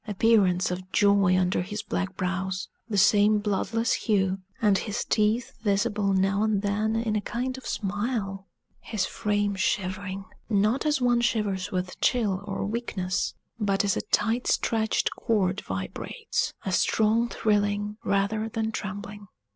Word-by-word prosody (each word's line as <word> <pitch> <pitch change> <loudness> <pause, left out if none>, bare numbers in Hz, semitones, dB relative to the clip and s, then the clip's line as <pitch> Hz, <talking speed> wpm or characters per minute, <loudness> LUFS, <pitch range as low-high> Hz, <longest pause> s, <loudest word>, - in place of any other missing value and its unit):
appearance 195 -4 +3
of 185 +1 -6
joy 200 -2 +4
under 180 -1 +1
his 205 +3 -5
black 190 0 -3
brows; 185 +1 -2 0.2
the 205 - -1
same 205 +2 +5
bloodless 215 +3 0
hue; 195 -3 +1 0.2
and 205 -3 +3
his 220 +2 -3
teeth 220 +3 +1
visible 205 -1 +1
now 195 +1 +2
and 215 -2 +1
then 210 +2 0
in 225 -1 0
a 210 - +1
kind 250 +4 -3
of 260 - -9
smile; 200 -1 -2 0.3
his 205 -4 -2
frame 205 -1 0
shivering, 190 0 -2 0.2
not 215 +7 +2
as 295 -2 +2
one 240 -1 +3
shivers 205 -5 0
with 180 0 -3
chill 210 -7 +1
or 195 -1 -3
weakness, 200 -4 -2 0.2
but 200 -1 +1
as 200 - +2
a - - -1
tight 230 +4 +1
stretched 220 -1 +1
cord 200 -4 0
vibrates 95 0 -3
a 190 - -1
strong 225 +5 +2
thrilling, 205 -1 0
rather 215 +1 0
than 220 0 -2
trembling. 205 0 -6
205 Hz, 145 wpm, -26 LUFS, 195-220 Hz, 0.3 s, same